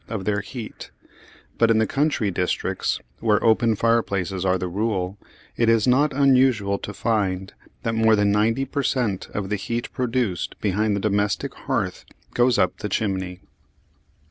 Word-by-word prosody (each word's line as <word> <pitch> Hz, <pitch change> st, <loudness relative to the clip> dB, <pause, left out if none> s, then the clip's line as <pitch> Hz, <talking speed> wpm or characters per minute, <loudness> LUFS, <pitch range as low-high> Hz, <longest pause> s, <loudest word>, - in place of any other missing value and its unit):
of 105 Hz, -5 st, -4 dB
their 105 Hz, -1 st, 0 dB
heat; 110 Hz, +2 st, -8 dB, 0.7 s
but 115 Hz, -, +4 dB
in 115 Hz, -, +4 dB
the 110 Hz, -, +3 dB
country 135 Hz, -4 st, 0 dB
districts, 90 Hz, 0 st, -1 dB, 0.2 s
where 105 Hz, -2 st, +2 dB
open 115 Hz, 0 st, +3 dB
fireplaces 100 Hz, -5 st, 0 dB
are 95 Hz, -1 st, +2 dB
the 90 Hz, 0 st, -3 dB
rule, 95 Hz, -1 st, -2 dB, 0.4 s
it 115 Hz, -1 st, +2 dB
is 115 Hz, -2 st, +4 dB
not 135 Hz, +4 st, +3 dB
unusual 130 Hz, -7 st, +3 dB
to -, -, -6 dB
find 100 Hz, -4 st, -1 dB, 0.3 s
that 115 Hz, -, -1 dB
more 110 Hz, 0 st, +4 dB
than 105 Hz, -1 st, +2 dB
ninety 115 Hz, +6 st, +2 dB
per 140 Hz, +2 st, -2 dB
cent. 120 Hz, -9 st, -1 dB
of 100 Hz, -2 st, -3 dB
the 105 Hz, -, 0 dB
heat 115 Hz, +5 st, -4 dB
produced 120 Hz, -7 st, -2 dB
behind 105 Hz, +1 st, +1 dB
the -, -, -1 dB
domestic 105 Hz, +5 st, 0 dB
hearth 110 Hz, -10 st, -3 dB, 0.3 s
goes 120 Hz, 0 st, +3 dB
up 90 Hz, -, +1 dB
the 105 Hz, -, -4 dB
chimney. 95 Hz, -4 st, -2 dB
110 Hz, 160 wpm, -23 LUFS, 100-115 Hz, 0.7 s, but